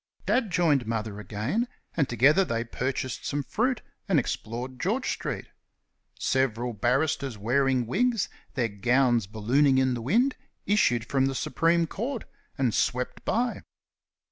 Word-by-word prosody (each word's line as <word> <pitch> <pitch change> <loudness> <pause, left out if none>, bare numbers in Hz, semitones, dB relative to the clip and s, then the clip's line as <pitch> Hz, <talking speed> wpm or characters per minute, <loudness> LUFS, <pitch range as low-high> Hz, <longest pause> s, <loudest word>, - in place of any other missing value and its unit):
Dad 220 +2 +2
joined 155 -9 +2
Mother 110 -2 -3
again, 110 - -2 0.3
and 150 -5 +1
together 135 - +5
they 115 -9 -1
purchased 130 +1 -3
some 145 0 -2
fruit 245 - 0 0.3
and 185 - +4
explored 125 +1 -4
George 225 - 0
street. - - -4 0.7
Several 125 -2 0
barristers 130 +3 0
wearing 130 +3 +2
wigs, 230 - +1 0.3
their 125 -4 +1
gowns 120 +1 +2
ballooning 130 +7 +2
in 130 -1 +3
the 120 - -3
wind, 240 - +2 0.3
issued 120 - +2
from 135 -1 +1
the 135 - -2
Supreme 165 +7 +2
Court 235 - -4 0.3
and 125 -5 +1
swept 125 0 -1
by. 240 +2 0
130 Hz, 135 wpm, -27 LUFS, 120-170 Hz, 0.7 s, together